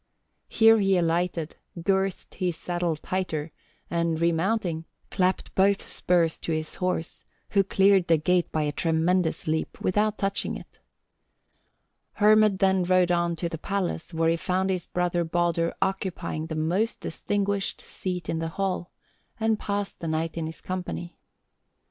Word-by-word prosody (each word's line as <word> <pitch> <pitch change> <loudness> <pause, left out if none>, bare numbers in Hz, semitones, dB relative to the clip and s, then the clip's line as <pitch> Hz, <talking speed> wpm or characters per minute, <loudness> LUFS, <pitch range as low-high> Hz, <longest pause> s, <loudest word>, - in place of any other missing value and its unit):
Here 225 0 +6
he 195 -2 +3
alighted, 170 -1 0 0.2
girthed 190 +2 0
his 180 -2 -1
saddle 175 -1 -1
tighter, 160 -2 -3 0.4
and 170 -1 0
remounting, 170 0 0 0.3
clapped 185 0 0
both 195 +1 +2
spurs 170 -2 +1
to - - -4
his 155 -1 -2
horse, 180 -2 -2 0.3
who 200 -1 +4
cleared 195 -1 +4
the 165 -1 +5
gate 175 +3 +1
by 155 - 0
a 150 - 0
tremendous 165 +3 +1
leap 160 0 -2
without 210 +3 +1
touching 195 0 -1
it. - - -15 1.3
Hermod 215 -1 +5
then 190 -1 +3
rode 180 0 +3
on 170 -1 +1
to 170 +1 -2
the 165 -2 -6
palace, 190 -3 -2
where 165 -1 +1
he 165 - +1
found 185 +2 0
his 185 -2 -2
brother 175 -1 0
Baldur 170 0 +1
occupying 185 -4 -3
the 160 - -4
most 180 +9 0
distinguished 200 +2 -1
seat 180 -2 -5
in 160 - -1
the 165 - -2
hall, 190 -3 -1 0.5
and 220 -1 +1
passed 200 -1 -3
the 165 - -4
night 160 0 -1
in 165 -1 -2
his 160 - -9
company. 180 -1 -5
180 Hz, 150 wpm, -26 LUFS, 165-195 Hz, 1.3 s, Here